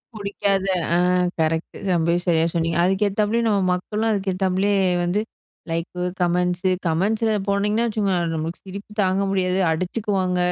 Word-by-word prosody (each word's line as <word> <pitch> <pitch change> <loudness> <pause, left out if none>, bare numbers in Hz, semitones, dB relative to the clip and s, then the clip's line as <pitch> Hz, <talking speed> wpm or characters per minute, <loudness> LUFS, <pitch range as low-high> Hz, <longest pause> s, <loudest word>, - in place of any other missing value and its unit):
புடிக்காத, 200 -1 -1 0.3
ஆ - - +4 0.4
கரெக்ட்‌டு. 160 +1 -1
ரொம்பவே 170 0 +2
சரியா 165 -2 +3
சொன்னீங்க. 165 -1 0
அதுக்கேத்தப்பலயும், 210 +4 +1
நம்ம 200 -2 +2
மக்களும் 215 +5 -2
அதுக்கேத்தாப்புலயே 195 0 +1 0.3
வந்து 175 +4 0 0.5
லைக்கு, 165 +2 -3 0.2
கமெண்ட்ஸு 180 +1 +1 0.2
கமெண்ட்ஸில 215 +7 +1 0.2
போனீங்கன்னா 210 +3 +1
வச்சுக்கோங்க. 205 -4 0 0.2
நம்மளுக்கு 160 +2 -4
சிரிப்பு 200 +2 -8
தாங்க 190 +1 +1
முடியாது, 185 -1 +1
அடிச்சுக்குவாங்க. 185 +1 -1
190 Hz, 120 wpm, -22 LUFS, 175-205 Hz, 0.5 s, ஆ